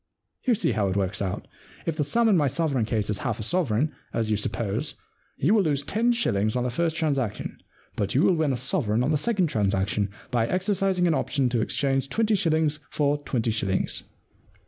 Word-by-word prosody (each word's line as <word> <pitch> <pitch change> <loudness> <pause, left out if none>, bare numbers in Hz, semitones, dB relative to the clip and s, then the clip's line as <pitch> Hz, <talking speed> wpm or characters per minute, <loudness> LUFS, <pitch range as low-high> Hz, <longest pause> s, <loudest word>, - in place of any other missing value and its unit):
You 245 - +5
see - - +1
how 105 -3 +1
it 95 - -1
works 100 0 0
out. 95 -2 -3 0.4
If 165 - -1
the 155 - 0
sum 230 +11 +2
in 210 - +5
my 150 -5 +3
sovereign 135 -4 0
case 110 -2 -1
is 100 - -3
half 120 -4 -2
a - - -3
sovereign, 150 - +1 0.2
as 110 -2 -1
you - - +3
suppose, 110 +6 -2 0.4
you 160 +10 +3
will 220 - +5
lose 145 -5 0
ten 230 +9 +1
shillings 110 - 0
on 125 - +1
the 125 - -1
first 165 +4 0
transaction, 140 -10 -2 0.4
but 100 +2 -2
you 140 - +4
will 185 - +5
win 155 -4 +1
a 130 - -1
sovereign 120 -3 +1
on 140 - +1
the 155 - +3
second 205 -1 +1
transaction 100 - 0 0.2
by 115 -2 +1
exercising 190 - +1
an 170 - +3
option 140 -3 +1
to 120 -2 0
exchange 135 +3 0
twenty 220 +3 +1
shillings 160 -5 +2
for 145 0 +1
twenty 115 -5 0
shillings.' 100 -4 0
140 Hz, 205 wpm, -26 LUFS, 110-165 Hz, 0.4 s, You